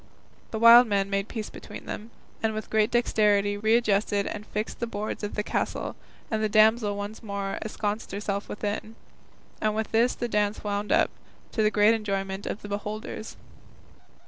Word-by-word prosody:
The 220 - -3
wild 235 +2 +9
men 200 -1 0
made 195 +1 0
peace 220 -3 -5
between - - -10
them, 215 +2 -6 0.3
and 220 -1 0
with 215 - -5
great 220 0 +3
dexterity 210 -4 +2
readjusted 210 -2 +2
and 210 0 -5
fixed 210 +2 -4
the 235 - -2
boards 215 -1 -4
of 205 - -3
the 210 - -1
castle, - - -2 0.4
and 220 -1 0
the 215 - +1
damsel 215 0 +4
once 205 +2 -5
more 200 -3 -3
ensconced 215 0 -3
herself 200 0 -3
within; 210 +1 -4 0.7
and 215 0 +1
with 220 0 -2
this 230 +3 +3
the 240 - -2
dance 210 -2 0
wound 205 0 -2
up, - - +4 0.4
to 225 - 0
the 215 - +4
great 210 +1 +5
enjoyment 195 -3 -2
of - - -4
the - - -6
beholders. 210 +2 -5
210 Hz, 170 wpm, -27 LUFS, 205-220 Hz, 0.7 s, wild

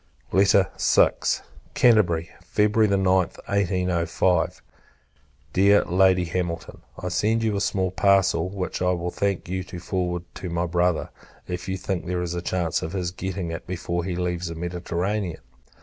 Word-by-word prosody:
VI. 100 0 +5 1.1
Canterbury, 90 -9 +3
February 105 +1 +2
9th, 95 -2 +2
1805. 90 -3 0 0.9
Dear 100 +2 +5
Lady 95 0 +3
Hamilton, 85 -1 -4 0.2
I 90 - -4
send 110 +6 +1
you 110 -2 +1
a 100 - -1
small 95 -2 0
parcel; 95 -3 +3
which 95 -2 -4
I 90 0 +2
will 90 0 -3
thank 100 -2 -1
you 95 +1 -2
to 90 - -8
forward 90 -1 -2
to 90 - -6
my 85 +1 -1
Brother, 90 -1 0 0.4
if 90 +1 -5
you 95 - -1
think 95 -1 -3
there 90 0 -1
is 85 -1 -3
a 90 - -3
chance 85 -2 -1
of 80 - -5
his 90 -3 -2
getting 95 -1 -4
it 85 - -6
before 85 -1 -3
he 90 0 -3
leaves 90 0 -2
the 85 - -5
Mediterranean. 90 +2 -3
90 Hz, 150 wpm, -24 LUFS, 85-95 Hz, 1.1 s, VI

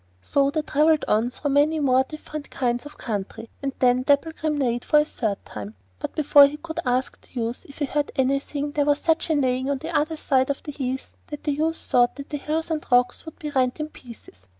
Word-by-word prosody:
So 275 - +2
they 310 +2 -1
travelled 305 +1 +3
on 220 +3 +2
through 285 +3 -3
many 295 +3 +3
more 260 -2 +4
different 305 +1 -8
kinds 245 +1 -1
of 295 - -14
country, 225 +1 -5
and 275 -1 -1
then 250 0 +3
Dapplegrim 300 +2 +1
neighed 240 -3 0
for 300 - +3
the 300 - +5
third 215 -9 -3
time; 105 0 -8 0.2
but - - -5
before 290 -2 +7
he 295 +1 -6
could 320 +1 -6
ask 250 +1 0
the 255 - -8
youth 230 +1 -3
if 280 - -13
he 290 - 0
heard 290 +1 -1
anything, 275 +2 0
there 290 -1 +1
was 290 -1 +3
such 325 +2 0
a 315 - +3
neighing 260 -1 +1
on 280 - +1
the - - -6
other 310 +2 +1
side 265 -3 +2
of 280 - -2
the 295 - -5
heath 265 -2 -4
that 295 - -7
the 295 - 0
youth 315 +3 0
thought 245 0 +2
that 280 0 -9
hills 310 +3 -2
and 310 -1 -1
rocks 245 +3 +3
would 320 - -9
be 300 -2 -5
rent 260 0 +1
in 305 0 -3
pieces. 220 - -14
280 Hz, 225 wpm, -24 LUFS, 250-300 Hz, 0.2 s, before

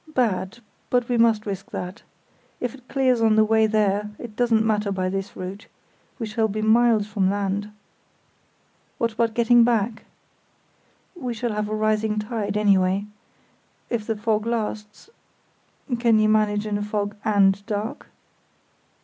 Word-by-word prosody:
Bad; 215 -3 0 0.3
but 245 -1 +1
we 245 -2 0
must 225 -2 +3
risk 195 -2 -5
that. 180 +2 -6 0.6
If 245 -2 -3
it 255 -2 -16
clears 260 -3 +2
on 220 -1 +4
the 215 0 +5
way 220 0 +3
there 210 -1 +1
it 230 -3 -9
doesn't 230 -2 +2
matter 210 -2 0
by 185 -1 -1
this 195 +1 -4
route; 190 +3 -7 0.5
we 230 - -3
shall 220 +1 0
be 215 +1 -3
miles 225 -1 +4
from 205 -3 0
land." 200 +1 -2 1.3
"What 230 0 0
about 225 0 0
getting 240 0 +5
back?" 225 -1 0 1.1
"We 250 -8 -4
shall 240 +1 -2
have 210 0 -2
a 215 - -1
rising 215 0 0
tide, 210 -1 -2
anyway. 195 -1 +2 0.9
If 225 -3 -2
the 225 -2 -1
fog 215 0 0
lasts—can 230 - -3
you 215 0 +3
manage 210 -1 +2
in 205 -1 -1
a - - -3
fog 205 -1 -2
and 200 -2 +3
dark?" 215 +6 -4
215 Hz, 150 wpm, -23 LUFS, 205-230 Hz, 1.3 s, the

